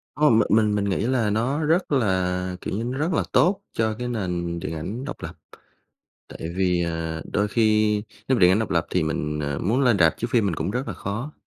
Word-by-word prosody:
Hông, 145 -7 +4
m - - +6
mình 105 -2 +3
mình 100 -1 0
nghĩ 95 - 0
là 125 -5 +1
nó 130 +9 0
rất 165 +2 +1
là, 95 -6 0
kiểu - - -4
như, 115 - -2
nó 125 +2 -3
rất 160 +4 0
là - - +1
tốt 190 +3 +3
cho 110 -1 0
cái 125 - -3
nền 90 -7 -3
điện 80 - -5
ảnh 105 - -5
độc - - -7
lập. - - -6 0.9
Tại 80 +1 -7
vì, 90 -2 +1
à, 80 -1 -3
đôi 105 +1 +1
khi 110 -1 +2 0.3
nếu 130 -3 +3
điện 90 -1 +6
ảnh 95 - +3
độc 110 - -2
lập 85 -2 +1
thì 90 - +1
mình, 75 -1 -2
ờ, 70 -1 -2
muốn 115 +8 +1
lên 120 -6 +3
rạp 80 -3 +4
chiếu 120 - -3
phim 115 -4 +3
mình 90 - 0
cũng 95 - -2
rất 125 +5 -3
là - - -4
khó. 120 +9 -5
105 Hz, 235 wpm, -24 LUFS, 90-120 Hz, 0.9 s, m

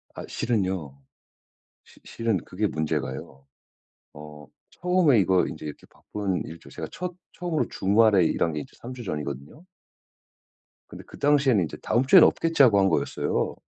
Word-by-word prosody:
아 - - -7
실은요. 95 - -2 0.9
시 - - -21
실은 115 -3 -1
그게 100 +5 -3
문제가요. 75 -5 -4 0.7
어 75 -1 -12 0.2
처음에 180 -9 +2
이거 95 -1 +3
인제 75 - -6 0.2
바쁜 100 -3 -4
일 80 - -9
저 - - -15
제가 - - -7
첫 180 0 -5 0.2
처음으로 175 -3 -2
주말에 100 -1 +3
일한 80 0 0
게 75 - -3
이제 - - -12
3 125 +2 -8
주 125 -1 -8
전이거든요. 75 - -6 1.2
근데 - - -11
그 - - -14
당시에는 140 -7 +3
인제 80 - -6
'다음 120 +4 +1
주에는 170 +6 +8
없겠지.' 165 -3 +2
하고 110 -6 +5
한 95 0 +3
거였어요. - - -1
100 Hz, 305 characters per minute, -25 LUFS, 80-130 Hz, 1.2 s, 주에는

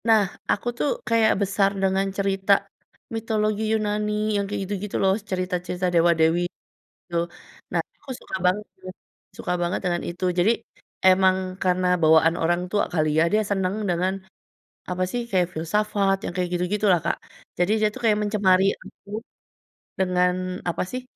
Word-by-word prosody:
Nah 220 -2 +6 0.3
aku 205 - -1
tuh 290 - +1 0.2
kayak 225 -1 +4
besar 195 0 +2
dengan 195 0 +1
cerita, 195 0 +2 0.6
mitologi 215 -1 0
Yunani 210 0 0
yang 200 - 0
kayak 205 - -3
gitu-gitu 200 +1 -4
loh 190 0 +4 0.2
cerita-cerita 180 -1 -2
dewa-dewi 170 0 +3 0.4
gitu 170 - -9 0.6
nah - - +2 0.2
aku 275 - -14
suka - - -5
banget 205 +4 +1 0.7
suka 180 - -2
banget 175 +1 -1
dengan 175 -2 0
itu 175 +2 -6
jadi, 195 +6 +5 0.6
emang 185 0 +5 0.3
karena 185 0 +2 0.2
bawaan 160 +1 +5
orang 175 +2 +1
tua 205 - +2
kali 155 -3 +1
ya 160 - +5
dia 215 - +4
senang, 190 -1 0 0.2
dengan 180 +2 +1 0.8
apa 180 0 -1
sih, 245 - -2
kayak 185 -2 +2
filsafat 195 +4 +1
yang - - -2
kayak 180 -1 0
gitu-gitu 180 +4 0
lah 175 - +3
Kak, - - 0 0.4
jadi 175 +4 +2
dia 215 - +5
tuh - - -7
kayak 210 -1 +4
mencemari 200 -3 +3
aku, 200 +2 -9 0.8
dengan, 185 0 +1
apa 170 - -1
sih, 255 - -3
190 Hz, 150 wpm, -24 LUFS, 180-210 Hz, 0.8 s, Nah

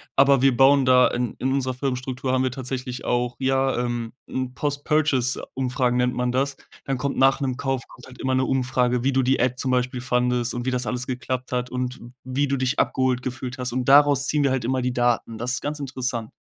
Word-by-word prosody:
Aber 135 -1 +5
wir 135 -3 +4
bauen 135 +1 +5
da 125 0 +6
in 120 -2 -2
in 130 - 0
unserer 130 -2 0
Firmenstruktur 130 0 -3
haben 130 0 +2
wir 130 - 0
tatsächlich 125 -1 -5
auch, 120 0 0
ja, 135 0 +1
ähm, 120 -1 -3 0.2
'n 130 -1 -3
Post 145 +1 -2
Purchase 145 -5 +1
Umfragen 125 -1 0
nennt 125 0 +1
man 125 0 -1
das. 135 +2 0 0.3
Dann 135 -1 -1
kommt 140 -1 -2
nach 135 +1 +4
'nem 130 -2 -1
Kauf 135 -2 -1
kommt - - -15
halt 130 -1 -14
immer 130 0 0
'ne 130 - +2
Umfrage, 125 -2 0
wie 135 - +2
du 130 0 +2
die 130 +2 +2
App 125 0 +1
zum 130 0 -1
Beispiel 125 0 0
fandest 125 -1 0
und 120 0 -4
wie 130 - 0
das 125 -1 -1
alles 125 0 -3
geklappt 130 0 -4
hat 125 0 -1
und 125 0 -3 0.2
wie 130 +3 -1
du 140 - 0
dich 130 +1 -1
abgeholt 130 -1 +1
gefühlt 125 0 -5
hast. 125 -1 -3
Und 125 0 -1
daraus 145 0 +6
ziehen 150 -1 +1
wir 140 - +2
halt 130 -3 -1
immer 130 +1 0
die 125 0 -1
Daten. 120 -2 0
Das 125 +2 -2
ist - - -2
ganz 145 +1 -4
interessant. 125 -4 -3
130 Hz, 230 wpm, -23 LUFS, 125-135 Hz, 0.3 s, da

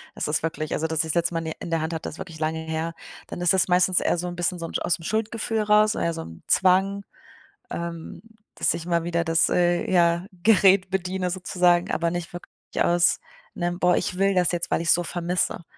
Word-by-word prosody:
das - - -3
ist 150 0 0
wirklich 160 -1 -3
also, 160 - -1
dass 160 0 -3
ich 160 - -2
das - - -3
letzte 170 0 +1
Mal - - +1
in - - -7
die 160 - -3
in - - -7
der 165 -1 +1
Hand 160 +1 -3
hatte 160 - -4
ist - - -11
wirklich 165 -4 -9
lange 160 +1 -1
her. 160 +1 -3 0.3
Dann - - -7
ist 175 +1 +3
das 190 - +2
meistens 180 0 +3
eher - - 0
so 180 - -3
'n 175 - -5
bisschen 175 +1 -1
so 165 - -4
aus 175 - +1
dem 165 - -14
Schuldgefühl 220 +1 -1
raus, 210 0 +4
oder - - -1
eher 170 - 0
so 165 - -5
'n 80 - -11
Zwang. 195 +2 +3 0.7
Ähm, 170 +1 -6 0.3
dass - - +1
ich 170 0 -6
mal 170 -1 0
wieder 170 -1 -1
das, 165 0 +2
äh, 175 0 +1
ja, 170 0 +3 0.2
Gerät 195 -3 +5
bediene 185 -1 -2
sozusagen, 180 -1 +1
aber 170 0 0
nicht 175 -1 -5
wirklich 175 - -9 0.3
aus 175 0 +2 0.3
'nem: 175 0 -2
„Boah, 180 -1 +3
ich 180 - -2
will 195 0 +2
das 180 -1 +2
jetzt, 175 0 -3
weil - - +1
ich's 170 - +4
so 175 - -1
vermisse.“ 175 +1 -2
175 Hz, 235 wpm, -24 LUFS, 165-185 Hz, 0.7 s, Gerät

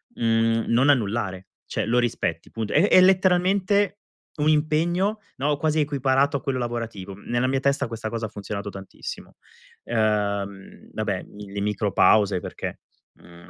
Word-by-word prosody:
mhmm, 115 0 +2
non 125 +5 +3
annullare. 100 -7 0 0.2
Cioè - - -2
lo 120 +2 +2
rispetti, 120 -1 -2
punto. 110 -2 -4
È 170 +7 +4
è - - +7
letteralmente 190 +2 +3 0.4
un 150 +1 +3
impegno, 170 +7 +1 0.2
no, 145 +2 0
quasi 155 +1 +1
equiparato 140 -1 +2
a - - -9
quello 130 -2 -1
lavorativo. 115 -5 -4
Nella 120 +5 -1
mia 135 +1 +1
testa 140 0 +1
questa 115 -1 -5
cosa 115 0 -3
ha - - -12
funzionato 100 0 -6
tantissimo. 95 -1 -9 0.5
Ehm, 100 -3 -2
vabbè, 105 -4 -2
i 100 -1 -9
le 100 - -4
micro 105 0 -1
pause 100 -2 +4
perché, - - -6 0.3
mhmm, 85 0 -17
120 Hz, 150 wpm, -24 LUFS, 105-150 Hz, 0.5 s, è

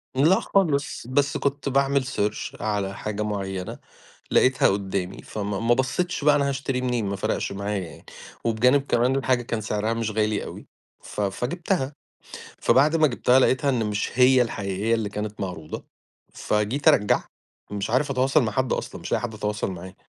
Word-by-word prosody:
لأ 160 +8 +4
خالص، 150 -10 0
بس 140 +2 +1
كنت 140 0 -1
باعمل 140 0 +2
search 105 -5 -3
على 100 -2 -1
حاجة 105 0 -4
معينة 95 -3 -4 0.5
لقيتها 130 +1 +4
قدّامي 95 -2 -2
فما 100 -2 -4
ما 115 +1 +3
بصيتش 140 +6 -1
بقى 150 0 +5
أنا 140 -1 +1
هاشتري 135 -2 -2
منين 125 -3 0
ما 100 0 -2
فرقش 95 - -2
معايا 100 +1 -2
يعني، - - -15 0.4
وبجانب 125 +5 +3
كمان 125 +3 +2
الحاجة 130 -2 +1
كان 115 -2 -3
سعرها 105 +1 -1
مش 115 -1 -2
غالي 105 0 0
أوي - - -9 0.3
ف - - -6
فجبتها، 135 - -1 0.6
فبعد 150 +5 +4
ما 155 - +5
جبتها 125 0 +3
لقيتها 130 +2 +2
إن 120 -4 +1
مش 105 -1 -2
هي 130 0 +6
الحقيقية 105 -1 -1
اللي 110 -2 -2
كانت 105 0 -5
معروضة 90 -5 -5 0.5
فجيت 105 +7 -1
أرجع 105 - +4 0.5
مش 100 0 -3
عارف 140 +4 +1
أتواصل 135 +2 +3
مع 110 - -1
حد 130 +3 0
أصلًا - - -4
مش - - -7
لاقي - - +1
حد 120 -2 -4
اتواصل 105 -1 -2
معاه، 95 +1 -9
115 Hz, 165 wpm, -24 LUFS, 105-135 Hz, 0.6 s, هي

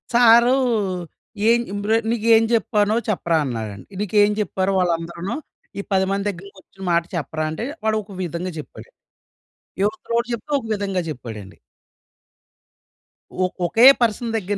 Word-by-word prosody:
Sir 235 +1 +6 0.9
ఏన్ 235 +1 +4
ఇంబ్ర్ 205 +2 -1 0.2
"నీకేం 225 -1 +4
జెప్పానో 215 -2 +2
చెప్పరా 170 -5 +1
అన్నారండి. 110 -6 -5
నీకేం 205 +1 +3
జెప్పారో 195 -2 -1
వాళ్ళందరును 170 +1 -2 0.4
ఈ - - -1
10 190 -1 +3
మంది 200 +1 -1
దగ్గరకొచ్చిన 195 0 -11
మాట 170 0 +3
చెప్పరా" 155 -1 -3
అంటే, 160 +9 -4 0.2
వాడొక 215 -3 -1
విధంగా 175 +1 -4
చెప్పాడన్ 150 - -12 0.9
ఇవతలోడు 230 +3 -1
జెప్తే 235 +5 -5
ఒక 240 - -11
విధంగా 195 -3 -2
జెప్పాడండి. 110 -8 -8 1.9
ఒక్ 185 - -6
ఒకే 225 +8 +4 0.2
పర్సన్ 230 0 0
దగ్గర 205 -1 -3
200 Hz, 120 wpm, -21 LUFS, 170-220 Hz, 1.9 s, Sir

